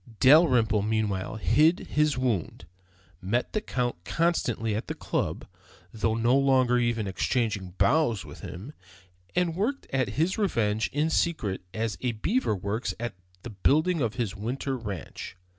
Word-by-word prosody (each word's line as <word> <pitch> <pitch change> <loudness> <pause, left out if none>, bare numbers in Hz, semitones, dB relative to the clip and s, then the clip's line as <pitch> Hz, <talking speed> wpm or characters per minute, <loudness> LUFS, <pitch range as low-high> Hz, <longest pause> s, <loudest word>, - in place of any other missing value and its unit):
Dalrymple 130 -7 +5
meanwhile 105 -2 -1
hid 125 - +4
his 150 -3 +2
wound, 120 -9 -2 0.6
met 115 +7 -1
the 215 - 0
Count 120 - -2
constantly 120 - 0
at 110 - -4
the - - -4
Club, - - -2 0.5
though 110 0 0
no 115 +3 +3
longer 130 -3 +3
even 120 -3 0
exchanging 100 -2 -1
bows 120 - +2
with - - -11
him, 95 - -8 0.6
and 175 -2 +1
worked 240 +10 -1
at 130 -5 +1
his 175 +8 +1
revenge 110 - +1
in 150 +3 0
secret 135 - 0
as 110 -4 -3
a 125 -2 0
beaver 175 - 0
works 100 +5 -3
at 120 0 -3 0.3
the 120 - -7
building 155 - +2
of 115 -3 -1
his 110 -5 -2
winter 125 +6 -3
ranch. 100 -6 -7
120 Hz, 145 wpm, -27 LUFS, 105-150 Hz, 0.6 s, Dalrymple